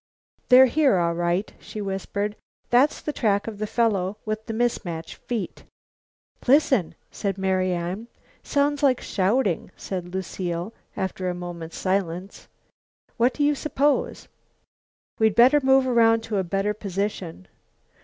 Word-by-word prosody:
"They're 255 0 +9
here, 270 -4 +3
all 170 -1 +1
right," 175 +3 -1
she 215 - -8
whispered. 200 +1 -3 0.4
"That's 255 +5 +4
the 300 - -3
track 205 -6 +1
of 215 -3 -6
the 215 - -2
fellow 205 -4 0
with 215 +1 -4
the - - -3
mis 240 0 0
mate 165 -3 -6 0.2
feet." 225 -7 -4 0.8
"Listen!" 265 - +3 0.2
said 200 -2 -3
Marian. 185 +1 -1 0.3
"Sounds 285 0 0
like 265 -3 +3
shouting," 195 -1 0
said 180 -2 -5
Lucile, 180 +1 -4 0.2
after 185 -1 -2
a 180 - -3
moment's 175 -2 -7
silence. 185 0 -2 0.7
"What 245 +2 +2
do 295 - 0
you 295 +1 +4
suppose?" 290 0 0 0.9
"We'd 220 -2 +3
better 260 +5 +6
move 265 0 +4
around 230 -2 +4
to 225 -2 -2
a - - 0
better 195 +3 -1
position." 195 - -4
205 Hz, 135 wpm, -24 LUFS, 185-240 Hz, 0.9 s, They're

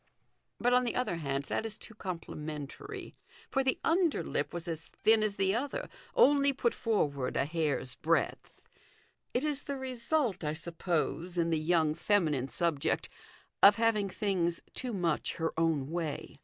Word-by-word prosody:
But, 245 +1 +3
on 250 0 +5
the 240 - -1
other 250 -9 0
hand, 140 -3 -2
that 145 - -2
is 220 -1 -5
too 220 - -8
compli 185 -5 -6
mentary, 150 -2 -6 0.4
for 270 - +2
the 260 -1 +1
underlip 330 - +1
was 175 0 -5
as 165 -1 -4
thin 220 0 +3
as 210 -2 0
the 195 -1 +2
other, 285 - -2 0.3
only 280 - +5
put 240 -3 +1
forward 145 - 0
a 130 - +2
hair's 150 -5 -1
breadth. 160 +5 -1 0.7
It 250 - +2
is 295 -2 -1
the 280 -1 -3
result, 255 - -1
I 150 0 0
suppose, 170 +1 -2
in 165 -1 +2
the 160 - +2
young 160 -1 +2
feminine 155 -9 +1
subject 145 +3 0 0.5
of 200 +1 +9
having 220 -3 +2
things 180 -4 0
too 250 - -1
much 175 -7 0
her 160 0 -1
own 160 -4 +1
way. 165 -3 -4
175 Hz, 160 wpm, -31 LUFS, 155-235 Hz, 0.7 s, of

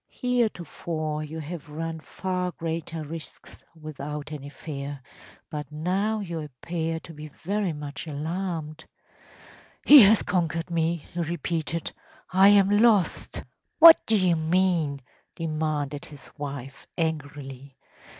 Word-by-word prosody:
Heretofore 170 - -2
you 155 +1 -7
have 155 0 -7
run 160 +2 -4
far 180 +2 -3
greater 165 -1 -4
risks 160 +1 -10 0.2
without 150 -1 -6
any 145 -2 -7
fear, 140 -1 -7 0.5
but 150 -2 -5
now 190 +8 -1
you 170 -4 -4
appear 160 +3 -4
to 165 - -11
be 150 0 -9
very 195 +5 -2
much 150 +1 -6
alarmed.‚ÄĚ 160 +1 -4 1.0
“He 290 -2 +11
has 215 +1 +6
conquered 170 -2 -1
me!‚ÄĚ 170 +1 -1
he 160 - -5
repeated. 165 -1 -3 0.4
“I 190 +1 +7
am 200 -1 +5
lost!‚ÄĚ 215 -6 +2 0.3
“What 330 0 +10
do 225 - +3
you 185 -3 +3
mean?‚ÄĚ 160 -4 +1 0.3
demanded 155 -3 -2
his 145 -2 -13
wife, 140 -2 -7
angrily. 140 -4 -4
160 Hz, 120 wpm, -26 LUFS, 150-180 Hz, 1.0 s, He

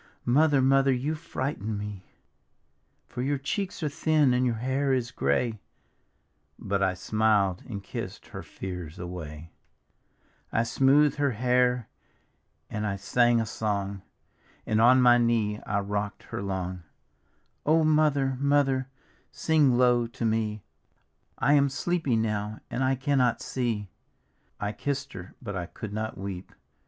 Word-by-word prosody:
Mother, 140 +1 +4
Mother, 135 +1 +4
you 130 +5 0
frighten 130 -8 -4
me! 100 -2 -7 1.0
For 125 - -5
your 140 +2 0
cheeks 180 +7 -3
are - - +1
thin 155 -2 +2
and 125 +1 +2
your 120 - 0
hair 130 +4 0
is 120 -2 -1
grayl 110 - 0 0.5
" - - -45 0.3
But 100 0 -2
I 95 -1 +2
smiled 105 -2 +1
and 100 -4 -5
kissed - - -7
her - - -7
fears 90 -4 -7
away, 85 -3 -7 1.0
I 115 - +2
smooth'd 135 +5 +3
her 140 -3 +1
hair 125 0 +2 0.8
and 105 0 -3
I 100 - -1
sang 120 +5 +2
a 115 - 0
song, 100 -2 -3 0.6
And 110 0 +1
on 125 +2 +6
my 120 0 +6
knee 115 -3 +1
I 100 0 0
rocked 100 0 -3
her - - -2
long: 95 -2 -3 0.4
" - - -43
O 160 +1 +4
Mother, 150 -4 +2
Mother, 140 -2 +2 0.4
sing 150 -6 +3
low 120 -1 +3
to 115 0 -5
me 110 -2 -1 0.4
— - - -44 0.3
I 145 - +3
am 140 -1 +4
sleepy 150 -2 0
now, 105 -1 -1
and 130 - -1
I 130 +1 +2
cannot 130 -3 +1
sec! 120 -5 -2 0.4
" - - -44 0.3
I 105 0 -2
kissed 140 +5 -3
her, 90 -1 -9
but 100 -4 -5
I 90 -2 -3
could 105 +2 -8
not 110 +1 -4
weep. 95 -1 -6
120 Hz, 150 wpm, -27 LUFS, 105-135 Hz, 1.0 s, on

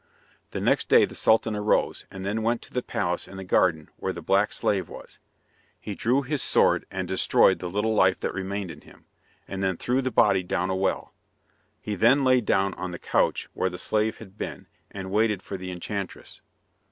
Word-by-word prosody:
The - - -5
next - - +1
day - - +6
the - - -11
Sultan 110 0 +2
arose, 105 0 0
and 95 0 -8
then 105 +3 -1
went 115 +1 0
to - - -14
the 125 - 0
palace 90 -6 -2
in 95 - -11
the 95 - -6
garden 85 -4 +2
where 95 - -2
the 85 -2 -8
black 100 +4 +2
slave 100 -3 -1
was. - - -12 0.6
He 105 - -6
drew 125 +7 +1
his 145 +1 -1
sword - - +3
and 95 -1 -4
destroyed 95 0 +3
the 90 - -5
little 105 +4 0
life 95 -3 +3
that - - -2
remained 95 -1 -4
in 75 - -12
him, - - -19 0.4
and 95 -1 -5
then 95 -2 0
threw 125 +2 0
the 130 - -1
body 95 -6 +3
down 90 +1 -2
a - - 0
well. 95 +1 -1 0.7
He 105 - -4
then 120 +8 +4
lay 130 -1 +4
down 95 -3 +1
on 90 0 -5
the 85 - -6
couch - - 0
where 95 - 0
the 90 - -7
slave 110 +4 0
had 100 -2 -14
been, - - -6 0.2
and 95 -1 -7
waited 105 -2 +1
for 100 - -6
the 95 -1 -6
enchantress. 95 +2 -6
95 Hz, 205 wpm, -26 LUFS, 95-110 Hz, 0.7 s, day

